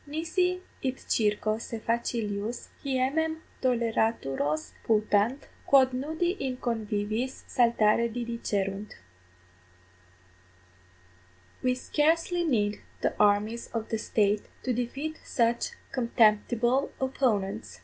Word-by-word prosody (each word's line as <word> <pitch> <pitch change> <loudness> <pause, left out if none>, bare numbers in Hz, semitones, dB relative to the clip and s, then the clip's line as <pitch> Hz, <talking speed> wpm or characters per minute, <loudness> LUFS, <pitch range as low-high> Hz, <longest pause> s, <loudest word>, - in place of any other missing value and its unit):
nisi 330 +5 +1 0.4
idcirco 215 -4 0
se 230 - -5
facilius 230 -1 -1 0.2
hiemem 280 +4 +1 0.3
toleraturos 220 - +1 0.2
putant, 215 +4 +2 0.2
quod 260 -2 +6
nudi 315 +7 0 0.2
in 255 -1 -3
conviviis 220 +1 -1 0.2
saltare 235 -1 +4
didicerunt. 210 -4 -2 2.7
_We 255 0 +2
scarcely 330 +5 +1
need 210 -9 +1 0.2
the - - +1
armies 210 +3 +2
of 225 -1 -2
the 225 - -1
State 205 -1 +1 0.2
to 255 - 0
defeat 270 +6 -3
such 235 -1 +1 0.2
contemptible 240 +2 +2
opponents. 210 - -1
235 Hz, 85 wpm, -28 LUFS, 210-260 Hz, 2.7 s, quod